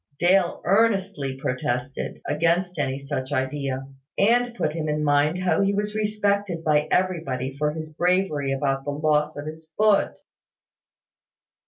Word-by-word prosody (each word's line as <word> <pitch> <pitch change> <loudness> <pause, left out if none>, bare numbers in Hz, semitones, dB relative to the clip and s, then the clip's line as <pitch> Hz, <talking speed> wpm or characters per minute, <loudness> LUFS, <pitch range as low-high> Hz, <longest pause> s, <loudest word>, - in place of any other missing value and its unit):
Dale 180 +1 +2
earnestly 195 -10 +1
protested, 125 0 -3
against 170 +3 0
any 135 -2 0
such 140 -1 -4
idea, 135 0 -2 0.3
and 240 +3 +3
put 150 - -1
him 155 -1 -3
in 150 0 0
mind 145 +3 +3
how 185 +1 +1
he 200 0 +2
was 210 +1 -1
respected 205 -4 0
by 150 -1 +2
everybody 140 -8 -1
for 150 +1 0
his 155 0 -7
bravery 175 -5 +1
about 135 0 0
the 145 - -4
loss 150 +1 +1
of 145 - -5
his 160 +1 -9
foot. 215 -1 +3
155 Hz, 140 wpm, -24 LUFS, 140-190 Hz, 0.3 s, and